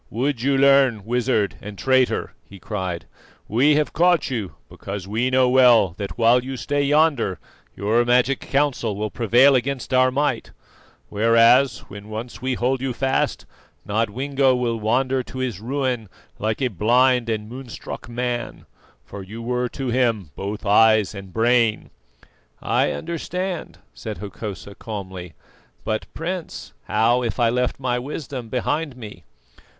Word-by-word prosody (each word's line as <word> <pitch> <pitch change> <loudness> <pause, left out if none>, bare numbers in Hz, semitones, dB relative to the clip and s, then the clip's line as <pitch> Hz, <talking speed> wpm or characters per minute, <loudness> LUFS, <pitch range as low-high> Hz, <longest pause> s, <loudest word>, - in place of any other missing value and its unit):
"Would 125 +2 -1
you 135 +1 +2
learn, 135 -6 +4
wizard 120 -4 0
and 105 -1 -9
traitor?" 130 +1 +1 0.2
he 100 - -11
cried. 95 -4 -4 0.4
"We 135 +7 +3
have 150 0 0
caught 175 -4 +2
you 110 -7 -4
because 95 +7 -7
we 115 +5 0
know 130 0 +3
well 125 -5 +5
that 100 +1 -5
while 120 +1 +4
you 135 0 -5
stay 145 +3 -1
yonder 140 - +2 0.4
your 110 +5 +2
magic 125 +2 +2
counsel 135 -7 0
will 105 +1 -3
prevail 120 +4 +4
against 130 0 -1
our 130 0 +5
might; 145 +3 -1 0.6
whereas, 115 +3 +4
when 105 +1 -11
once 110 +3 -7
we 130 0 -1
hold 125 +2 0
you 135 -2 -2
fast, 135 +2 -1 0.4
Nodwengo 130 +6 +1
will 120 -2 -1
wander 130 +4 +1
to 130 - -10
his 125 -7 -3
ruin 125 -2 -2 0.3
like 110 +5 -1
a 130 - +2
blind 120 +4 +2
and 105 -1 -2
moonstruck 125 0 -8
man, 120 0 -4 0.4
for 100 - -9
you 105 +4 -9
were 125 +1 -2
to 135 0 -4
him 115 - 0
both 105 +3 -5
eyes 110 0 +4
and 100 -2 -9
brain." 115 0 +1 0.7
"I - - +1
understand," 175 +2 -4 0.2
said 110 -3 -7
Hokosa 100 0 -7
calmly. 95 -6 -7 0.5
"But, 110 0 -3
Prince, 175 +1 -5
how 115 +4 +2
if 120 +1 -3
I 120 -1 +4
left 125 +1 -1
my 125 -2 -1
wisdom 130 -3 -6
behind 135 +3 -2
me?" 105 -8 -10
120 Hz, 145 wpm, -22 LUFS, 110-130 Hz, 0.7 s, well